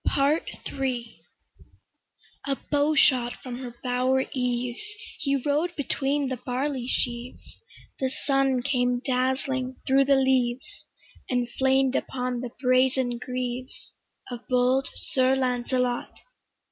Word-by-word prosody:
PART 285 +4 +2 0.2
III 250 -4 -3 1.3
A 275 -1 0
bow 295 +1 +3
shot 250 -4 +4
from 245 -1 -7
her 245 -2 -7
bower 255 +1 +2
eaves, 245 -1 -1 0.4
He 280 -1 +1
rode 295 +6 0
between 285 0 0
the 260 -1 -2
barley 255 +1 -2
sheaves, 245 -1 -2 0.4
The 265 - +1
sun 270 -2 +1
came 245 -2 +1
dazzling 260 0 0
thro' 270 +1 +5
the 275 0 +4
leaves, 260 -2 0 0.4
And 245 -1 +1
flamed 265 0 +2
upon 250 -1 -2
the 250 - -4
brazen 255 -1 +2
greaves 250 0 -5 0.4
Of 245 - -4
bold 255 +1 +2
Sir 260 0 +2
Lancelot. 250 -1 0
255 Hz, 115 wpm, -26 LUFS, 250-270 Hz, 1.3 s, thro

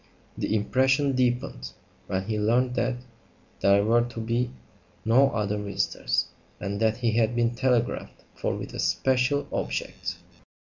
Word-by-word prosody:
The 110 - -1
impression 130 +5 +2
deepened 120 - -1 0.3
when 95 0 -1
he 105 +1 -2
learned 120 +4 +2
that 125 0 0 0.6
there 100 +1 +4
were 115 +2 +4
to 120 -1 -5
be 120 +2 0 0.6
no 130 +5 +5
other 105 -3 -1
visitors, 100 -11 0 0.3
and 100 0 -3
that 110 0 +2
he 120 -2 +1
had 115 +1 +2
been 120 0 +2
telegraphed 125 -1 0
for - - -2
with - - -6
a - - -12
very - - -7
special 130 +2 +1
object. - - -3
115 Hz, 145 wpm, -26 LUFS, 105-125 Hz, 0.6 s, no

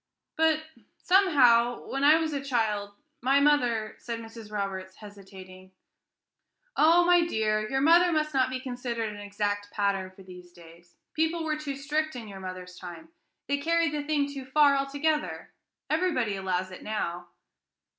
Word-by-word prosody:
"But, 315 -1 +2 0.3
somehow, 250 -11 +4
when 275 +1 -3
I 300 +2 +7
was 320 -1 -2
a 280 -1 -3
child, 215 -6 -1 0.3
my 270 +3 +3
mother" 245 -7 +2
said 235 -1 -5
Mrs. 225 -1 -11
Roberts, 190 -2 -4
hesitating. 190 -2 -13 1.0
"Oh, 335 +1 +5
my 355 0 +5
dear, 215 -5 0
your 270 0 0
mother 340 +4 +5
must 305 -1 0
not 260 -1 +2
be 255 0 -4
considered 245 -3 -4
an 205 - -10
exact 205 0 -3
pattern 200 -2 -1
for 190 +1 -16
these 180 -1 -13
days. 170 0 -17 0.2
People 320 +1 0
were 310 -1 -1
too 300 -2 -5
strict 300 +2 -2
in 235 -3 -7
your 195 -2 -9
mother's 185 -1 -8
time; 180 - -10 0.4
they 285 0 0
carried 335 +1 +1
the 300 -1 -2
thing 290 -1 0
too 280 -2 -7
far, 280 +2 +4
altogether; 285 +3 -2 0.3
everybody 310 - 0
allows 185 -1 -2
it 185 - -10
now." 175 -5 -4
245 Hz, 155 wpm, -27 LUFS, 200-300 Hz, 1.0 s, I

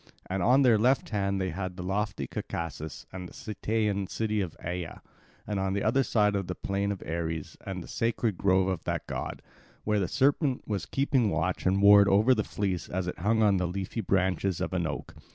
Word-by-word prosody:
And 95 0 -2
on 130 +8 +5
their 115 -4 +5
left 130 +5 +2
hand 100 -2 0
they 95 -1 -1
had 95 +1 -5
lofty 100 +4 -2
Caucasus 80 -3 -5
and 90 -1 -6
the - - -16
Cytaean 105 -2 -1
city 110 +1 -1
of 90 -4 -5
Aea, 90 0 -5 0.5
and 105 -2 -2
on 95 0 0
the 100 - -1
other 120 +5 +3
side 105 -5 +2
the 95 -2 -2
plain 100 +1 -1
of 100 - -5
Ares 80 -1 -3
and 95 -2 -4
the - - -11
sacred 115 -2 0
grove 95 0 +2
of 95 -4 -2
that - - -2
god, - - -5 0.4
where 105 -1 +1
the 95 - 0
serpent 135 - +1
was 105 -3 -2
keeping 135 -5 +1
watch 95 -1 -1
and 95 +2 +2
ward 100 0 +8
over 105 +6 +5
the 110 -3 0
fleece 95 -6 -3
as 95 0 -2
it 90 - -5
hung 110 +5 +2
on 100 -2 +4
the 90 -1 0
leafy 95 +5 -3
branches 95 -1 +1
of - - -2
an 85 -3 0
oak. - - -5
100 Hz, 205 wpm, -28 LUFS, 90-110 Hz, 0.5 s, ward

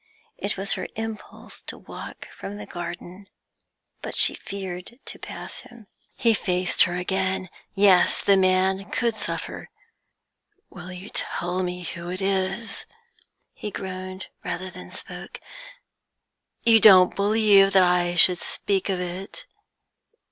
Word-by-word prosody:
It 200 - -2
was 195 +2 0
her - - -4
impulse 225 -1 -7
to - - -4
walk - - -9
from 205 +1 -7
the - - -7
garden, 175 +2 -7 0.7
but - - -6
she - - +4
feared 190 +2 -7
to - - -6
pass - - -7
him. 240 -3 -14 0.3
He 230 -1 +4
faced 180 -3 +1
her 175 - -3
again. 190 +1 -1 0.3
Yes, 195 -3 +5
the 200 - +4
man 190 +1 +2
could 235 -1 0
suffer. 220 - -5 1.0
'Will 180 0 -9
you 180 +3 -8
tell 175 +1 -2
me 180 0 -3
who 170 +1 -6
it 185 +1 -4
is?' 195 +3 -1 0.7
he 210 - -6
groaned 185 -1 -6 0.2
rather 185 +1 -4
than - - -11
spoke. - - -8 1.2
'You 225 -1 +7
don't 190 -4 +8
believe 200 -1 +5
that 190 -1 +7
I 175 -1 +2
should 175 +1 +5
speak 195 -1 -1
of 190 -2 0
it? 180 +2 -6
190 Hz, 135 wpm, -25 LUFS, 180-200 Hz, 1.2 s, don't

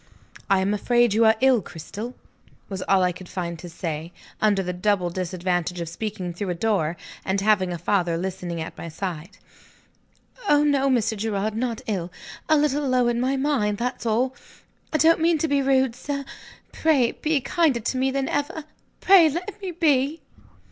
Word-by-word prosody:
"I 195 -1 +4
am 195 +2 +1
afraid 240 +1 +2
you 225 +2 +4
are 220 0 +6
ill, 260 -4 +5
Cristel?" 200 +9 -8 0.5
was 190 -2 -5
all 195 -1 +4
I 180 - +2
could 180 +1 -11
find 170 -2 -4
to 175 - -8
say, 165 -1 -5 0.3
under 205 -3 +3
the 180 0 -3
double 180 -1 0
disadvantage 180 -1 -2
of 170 - -4
speaking 180 0 -4
through 190 +3 -4
a 175 - -1
door, 175 -4 0 0.3
and 190 +1 0
having 195 -3 +2
a 175 - -3
father 175 -1 0
listening 180 -1 -4
at 160 - -6
my 170 - -7
side. 170 -1 -6 1.1
"Oh 295 0 +5
no, 280 -2 +2
Mr. 230 -4 +1
Gerard, 210 0 -2
not 230 -1 -2
ill. 180 -5 -3 0.4
A 310 - +5
little 290 -1 +1
low 250 -1 +3
in 240 0 0
my 260 +2 +1
mind, 265 -8 0
that's 245 0 -3
all. 245 +4 +1 0.6
I 310 - +2
don't 325 +2 +5
mean 330 0 +3
to 320 - 0
be 285 -1 +2
rude, 265 -3 +2
sir 280 +1 -4 0.5
pray 280 -7 +2
be 305 -1 0
kinder 280 -2 +1
to 235 - -2
me 265 +1 +2
than 270 0 -1
ever! 290 +2 -2 0.4
pray 370 -5 +7
let 370 +7 -5
me 385 - -4
be!" 305 -3 +1
220 Hz, 185 wpm, -24 LUFS, 180-275 Hz, 1.1 s, pray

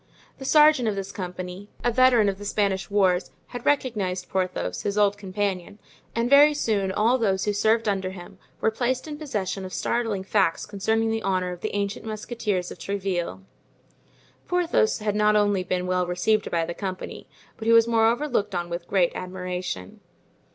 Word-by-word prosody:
The 270 - -7
sergeant 300 -4 +5
of 210 - 0
this 195 -1 -5
company, 180 +1 -6
a 240 - +2
veteran 245 -3 +5
of 195 -1 -1
the - - -8
Spanish 200 -2 0
wars, 190 -3 +2 0.2
had 245 -1 -7
recognized 210 -10 0
Porthos, 185 -1 -2
his 205 0 -2
old 205 -1 +4
companion, 200 -1 -3 0.4
and 230 +1 +1
very 290 +3 +7
soon 205 -8 0
all 230 +6 +2
those 195 -4 +1
who 210 - +1
served 220 +2 +2
under 190 -2 0
him 185 -2 -11 0.2
were 220 - +2
placed 255 +4 -1
in 295 -1 -6
possession 205 -10 -3
of 185 - -7
startling 225 -5 -1
facts 190 -4 +1
concerning 220 +2 0
the 225 0 -1
honor 185 -2 0
of 180 0 -8
the - - -3
ancient 200 0 -2
musketeers 215 -4 -3
of - - -10
Tréville. 185 - -3 1.0
Porthos 360 +5 +2
had 210 -1 -2
not 210 0 +3
only 205 -3 +2
been 180 0 -2
well 180 -1 0
received 205 +5 +1
by 165 -1 0
the 170 - -4
company, 185 0 -6 0.3
but 220 - -6
he - - +5
was 230 0 +6
moreover 230 +5 +2
looked 210 -8 -1
on 175 0 -3
with 170 0 -5
great 185 -3 +2
admiration. 180 - -5
205 Hz, 180 wpm, -25 LUFS, 185-225 Hz, 1.0 s, very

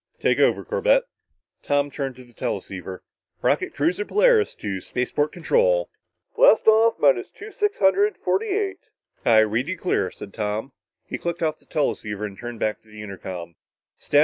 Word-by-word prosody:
"Take - - +2
over, - - +3
Corbett." 480 +1 +2 0.6
Tom 145 0 0
turned 135 -2 -4
to 130 - -13
the 120 -1 -21
teleceiver. 95 -3 -5 0.4
"Rocket - - +1
cruiser 170 +7 +1
Polaris 440 - +3
to 95 -3 -4
spaceport 145 +7 -1
control." - - +1 0.2
"... - - -51
Blast - - +5
off 220 +1 +5
minus 135 -5 +3
two 425 +1 -11
six 415 +1 -1
hundred 405 +8 +3
forty 450 +3 0
eight...." 400 -1 -1 0.5
"I 110 -2 +7
read 110 +5 0
you 185 +2 -3
clear," 180 - 0
said 100 - -11
Tom. 110 +4 -3 0.3
He - - -5
clicked 170 0 -3
off 155 -1 -1
the - - -29
teleceiver 105 -8 -2
and 100 -2 -7
turned 120 +1 -7
back 110 - -1
to - - -29
the 105 0 -10
intercom. 90 -4 -8
145 Hz, 170 wpm, -23 LUFS, -, 0.6 s, I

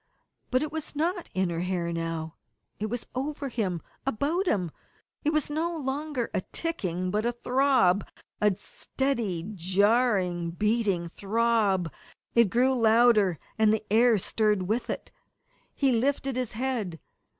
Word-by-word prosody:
But 255 +2 +2
it 305 - -4
was 315 -1 -5
not 345 +4 -1
in 190 -2 +1
her 165 - -2
hair 175 -1 -1
now. 165 -1 -3 0.5
It 215 - -1
was 240 +2 -4
over 280 +2 -3
him, 190 -8 -2 0.2
about 290 - 0
him 180 - +1 0.5
it 305 - +2
was 305 -2 +1
no 330 +3 -1
longer 280 -2 -3
a - - +1
ticking, 185 - -2
but 210 +2 0
a 240 - +1
throb, 245 -6 +2 0.3
a 210 -2 +4
steady, 215 -8 -3
jarring, 190 -1 +2
beating 205 -1 0
throb. 200 - +1 0.4
It 235 -4 +5
grew 255 +6 +3
louder, 225 -6 +4 0.2
and 215 -1 +5
the 220 0 0
air 230 0 +5
stirred 210 0 +1
with 220 +6 -1
it. - - -4 0.6
He 275 -2 +2
lifted 270 +2 +1
his 250 -3 -2
head. 225 -8 -2
225 Hz, 140 wpm, -27 LUFS, 185-265 Hz, 0.6 s, It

